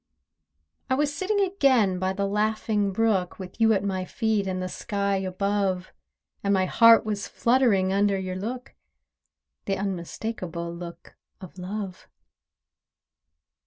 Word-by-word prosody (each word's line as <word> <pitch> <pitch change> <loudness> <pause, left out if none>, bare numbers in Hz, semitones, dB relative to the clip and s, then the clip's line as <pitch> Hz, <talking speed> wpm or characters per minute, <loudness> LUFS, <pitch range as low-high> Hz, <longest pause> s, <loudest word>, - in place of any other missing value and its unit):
I 260 - +3
was 290 +1 0
sitting 405 +5 -1
again 260 - +3
by 185 0 0
the 200 +1 -1
laughing 210 0 0
brook, 195 -3 +1
With 190 +4 -9
you 225 0 +6
at 195 - 0
my 190 -2 -1
feet, 215 0 -1
and 185 -1 -2
the 185 - -2
sky 200 +1 -1
above, 190 0 -1 0.5
And 200 0 +2
my 190 -1 +2
heart 230 +4 +6
was 210 -1 -3
fluttering 230 -7 +2
under 200 0 +2
your 185 -1 -4
look— 240 +7 -5 0.9
The 195 -1 -1
unmistakable 180 -2 -4
look 170 0 -9 0.3
of 185 -1 -11
Love. 190 0 -6
200 Hz, 130 wpm, -26 LUFS, 185-220 Hz, 0.9 s, you